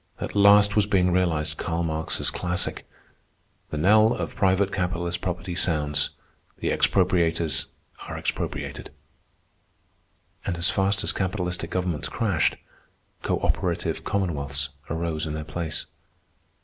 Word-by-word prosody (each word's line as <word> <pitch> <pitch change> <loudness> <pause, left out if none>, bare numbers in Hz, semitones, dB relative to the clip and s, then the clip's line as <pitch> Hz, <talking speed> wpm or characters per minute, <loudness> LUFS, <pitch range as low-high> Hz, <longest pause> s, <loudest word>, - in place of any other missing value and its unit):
At - - -5
last 100 0 +7
was 105 -2 +3
being 90 -3 +3
realized 80 -4 +1
Karl 85 +1 -1
Marx's 80 -1 -1
classic: 90 0 -2 0.8
"The 75 - -4
knell 110 +7 +5
of - - -4
private 95 0 +2
capitalist 90 -2 -2
property 90 0 -3
sounds. 75 -5 0 0.5
The - - -1
expropriators 85 -4 +2 0.4
are - - -4
expropriated." - - -4 1.5
And 85 - -2
as 85 +1 +2
fast 100 +1 +1
as - - +1
capitalistic 90 -2 -2
governments 90 -5 -2
crashed, 100 -9 +1 0.7
cooperative - - 0
commonwealths 70 -7 -1 0.2
arose 80 -1 -2
in 75 - -3
their 80 - -4
place. 80 +1 -3
90 Hz, 115 wpm, -25 LUFS, 80-95 Hz, 1.5 s, last